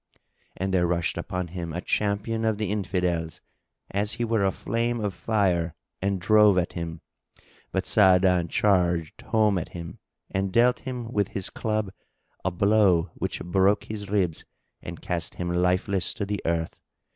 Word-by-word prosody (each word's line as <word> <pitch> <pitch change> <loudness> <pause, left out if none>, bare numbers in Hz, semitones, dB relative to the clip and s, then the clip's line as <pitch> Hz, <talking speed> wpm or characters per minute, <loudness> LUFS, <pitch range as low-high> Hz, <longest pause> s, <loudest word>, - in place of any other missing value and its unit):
And 95 +1 -2
there 90 -2 +3
rushed 85 -1 0
upon 90 0 -4
him 85 -1 -5
a 85 - -2
Champion 105 +4 -1
of 110 -2 +1
the 105 -2 -2
Infidels, 90 -5 -1 0.5
as 105 +2 0
he 120 - -1
were 110 -3 +1
a 95 - +3
flame 120 +4 -1
of 105 -3 -2
fire, 90 -8 0 0.3
and 100 0 0
drove 105 +1 +5
at 90 -1 0
him, 85 -2 -5 0.7
but - - -1
Sa'adan 90 -3 +4
charged 85 -4 +1
home 105 -4 +2
at 80 - -7
him 85 -1 -8 0.3
and 95 0 -1
dealt 120 +4 +4
him 120 -2 -5
with 100 -2 +1
his 95 - -1
club 110 -3 -2 0.5
a 95 - +1
blow 95 -2 +3
which - - -4
broke 95 +4 +2
his 105 -2 -7
ribs 95 -6 0 0.4
and - - -8
cast 85 -2 -3
him 90 -1 -3
lifeless 90 +1 +1
to 105 - -2
the 100 0 -3
earth. 85 -1 -1
95 Hz, 160 wpm, -26 LUFS, 90-105 Hz, 0.7 s, drove